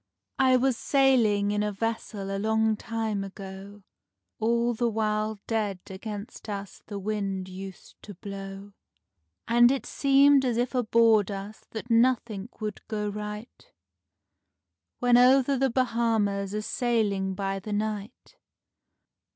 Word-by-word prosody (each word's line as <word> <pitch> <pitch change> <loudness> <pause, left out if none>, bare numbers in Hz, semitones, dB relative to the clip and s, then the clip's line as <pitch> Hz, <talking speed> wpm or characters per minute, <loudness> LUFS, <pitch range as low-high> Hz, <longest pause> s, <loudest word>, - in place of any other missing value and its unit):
I 260 -1 +5
was 255 -1 +1
sailing 230 -7 +3
in 210 0 0
a 210 0 0
vessel 205 -2 -3
a - - -2
long 220 +1 +2
time 220 -2 -3
ago, 195 +1 -9 0.6
All 235 +2 +1
the 235 +1 0
while 215 -1 -1
dead 215 -4 -1
against 205 +2 -7
us 200 -2 -6
the 205 - -5
wind 195 -2 -3
used 190 0 -10
to 205 - -10
blow, 195 +1 -8 0.7
And 240 +1 +6
it 275 - -2
seemed 275 0 +4
as 245 -3 0
if 245 +2 0
aboard 230 -4 +3
us 200 +2 -7
that 230 +2 -7
nothing 230 -3 +2
would 210 -2 -4
go 210 -1 -2
right, 210 - -8 1.3
When 245 -1 +4
over 265 +2 +5
the 270 +1 +2
Bahamas 225 -5 0
a 215 - -2
sailing 205 -6 0
by 195 0 -2
the 210 +2 -6
night. 210 - -4
215 Hz, 130 wpm, -27 LUFS, 200-235 Hz, 1.3 s, And